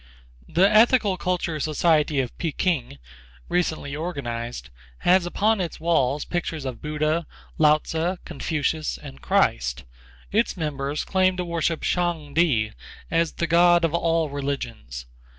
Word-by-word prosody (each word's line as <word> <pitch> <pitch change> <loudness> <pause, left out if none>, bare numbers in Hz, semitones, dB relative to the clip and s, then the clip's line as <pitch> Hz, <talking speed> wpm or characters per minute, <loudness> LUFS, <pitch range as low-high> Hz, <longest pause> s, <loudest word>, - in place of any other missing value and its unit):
The 185 +3 +4
Ethical 215 -1 +4
Culture 175 -3 -2
Society 155 -1 +2
of 125 - -6
Peking, 155 - -1 0.5
recently 160 -5 -1
organized, 120 - -5 0.3
has 180 0 +4
upon 210 +3 +1
its 170 -3 -4
walls 150 -4 +1
pictures 165 -4 -3
of 130 -2 -5
Buddha, 155 +2 -1 0.3
Lao 150 -1 +6
Tzu, 165 +4 -2
Confucius 155 0 -2
and 140 -2 -11
Christ. - - +1 0.5
Its 220 -1 +1
members 145 -2 -2
claim 185 -1 +2
to 180 - -2
worship 170 -1 -1
Shang 170 -5 -1
Ti 130 -11 +2 0.4
as 165 -1 +1
the 170 - -1
god 175 +1 +5
of 165 - -1
all 165 -2 +1
religions. 120 - -5
160 Hz, 130 wpm, -24 LUFS, 140-175 Hz, 0.5 s, Lao